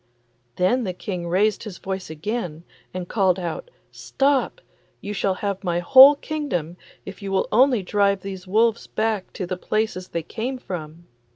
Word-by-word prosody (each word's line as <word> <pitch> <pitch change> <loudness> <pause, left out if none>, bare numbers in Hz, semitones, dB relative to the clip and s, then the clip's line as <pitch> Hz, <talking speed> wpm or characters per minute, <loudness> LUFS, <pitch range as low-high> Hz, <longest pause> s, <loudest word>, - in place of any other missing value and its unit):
Then 240 +8 +2
the 185 -4 -3
King 180 -3 -5
raised 205 +5 +1
his 210 -5 -8
voice 190 -2 -5
again 170 0 -4 0.3
and 180 -1 -5
called 190 -3 +2
out, 175 - -5 0.2
'Stop! 275 - 0 0.4
you 205 - -5
shall 195 -2 0
have 200 0 -3
my 175 -2 0
whole 265 +10 +8
kingdom, 280 - -3 0.3
if 195 0 -9
you 195 -1 -5
will 190 - +1
only 250 -3 +4
drive 200 0 +1
these 190 -1 -7
wolves 225 +3 +2
back 220 -3 -2
to 185 - -4
the 180 +1 -4
places 215 -2 -2
they 170 - -4
came 245 +9 -4
from. 170 -7 -8
195 Hz, 165 wpm, -23 LUFS, 180-225 Hz, 0.4 s, whole